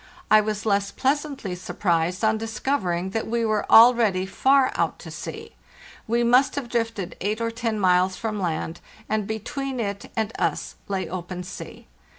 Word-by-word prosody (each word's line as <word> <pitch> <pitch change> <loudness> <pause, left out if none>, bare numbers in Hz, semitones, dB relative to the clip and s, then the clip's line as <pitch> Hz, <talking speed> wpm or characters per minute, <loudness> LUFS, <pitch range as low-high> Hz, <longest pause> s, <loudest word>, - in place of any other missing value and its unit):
I 215 0 +8
was 210 0 -3
less 200 -1 +1
pleasantly 275 -4 -1
surprised 180 0 -1
on 220 0 +2
discovering 210 -6 -1
that 225 +2 -2
we 230 0 0
were 215 -1 0
already 225 -5 +6
far 265 +7 +3
out - - -1
to - - -10
sea; - - -7 0.6
we 235 +2 +2
must 250 +3 +4
have 275 -4 -4
drifted 230 -6 -2
eight 210 +3 -1
or 230 0 -1
ten 230 -2 -2
miles 185 0 +3
from 215 -3 -3
land, 165 -1 -2 0.3
and 215 -2 -1
between 260 +5 -4
it 200 -3 -4
and 220 0 -1
us - - -1
lay 195 -2 -2
open 180 0 -5
sea. 180 - -9
215 Hz, 160 wpm, -24 LUFS, 190-235 Hz, 0.6 s, I